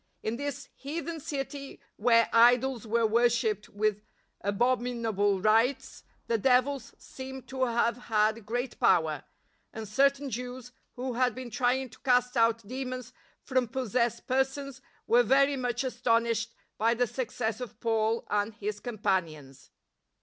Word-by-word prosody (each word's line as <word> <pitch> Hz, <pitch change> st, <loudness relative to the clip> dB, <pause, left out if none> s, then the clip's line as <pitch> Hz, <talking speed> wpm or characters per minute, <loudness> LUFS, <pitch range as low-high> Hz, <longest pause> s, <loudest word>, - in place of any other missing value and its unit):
In 220 Hz, +2 st, -2 dB
this 285 Hz, -1 st, -5 dB
heathen 325 Hz, +3 st, -5 dB
city 275 Hz, -1 st, -5 dB, 0.2 s
where 230 Hz, +1 st, +4 dB
idols 240 Hz, 0 st, +4 dB
were 230 Hz, +1 st, +2 dB
wor 235 Hz, +2 st, +4 dB
shipped 220 Hz, -3 st, -1 dB
with 210 Hz, 0 st, 0 dB, 0.4 s
abominable 225 Hz, -2 st, +1 dB
rites, 225 Hz, +6 st, +1 dB, 0.2 s
the 230 Hz, -1 st, 0 dB
devils 260 Hz, +3 st, +1 dB
seem 265 Hz, 0 st, -9 dB
to 260 Hz, +1 st, -1 dB
have 235 Hz, -1 st, +1 dB
had 215 Hz, +1 st, +2 dB
great 245 Hz, +4 st, -3 dB
power, 160 Hz, -3 st, +3 dB, 0.5 s
and 220 Hz, -1 st, -7 dB
certain 275 Hz, +5 st, +2 dB
Jews 250 Hz, +1 st, -6 dB, 0.2 s
who 255 Hz, 0 st, -3 dB
had 250 Hz, -1 st, +1 dB
been 255 Hz, -2 st, -7 dB
trying 255 Hz, +3 st, +1 dB
to -, -, -16 dB
cast 250 Hz, -1 st, +2 dB
out 230 Hz, -2 st, +2 dB
demons 255 Hz, 0 st, -5 dB, 0.3 s
from 255 Hz, -2 st, +1 dB
possessed 235 Hz, -1 st, -1 dB
persons 265 Hz, 0 st, -1 dB, 0.2 s
were 240 Hz, +1 st, +5 dB
very 275 Hz, +4 st, +4 dB
much 245 Hz, -1 st, -2 dB
astonished 230 Hz, -3 st, 0 dB, 0.2 s
by 230 Hz, +2 st, +3 dB
the 245 Hz, +1 st, +2 dB
success 225 Hz, -1 st, -3 dB
of 240 Hz, -2 st, -8 dB
Paul 225 Hz, 0 st, 0 dB
and 210 Hz, +1 st, 0 dB
his 210 Hz, -1 st, -4 dB
companions. 185 Hz, -, -3 dB
240 Hz, 135 wpm, -29 LUFS, 220-260 Hz, 0.5 s, were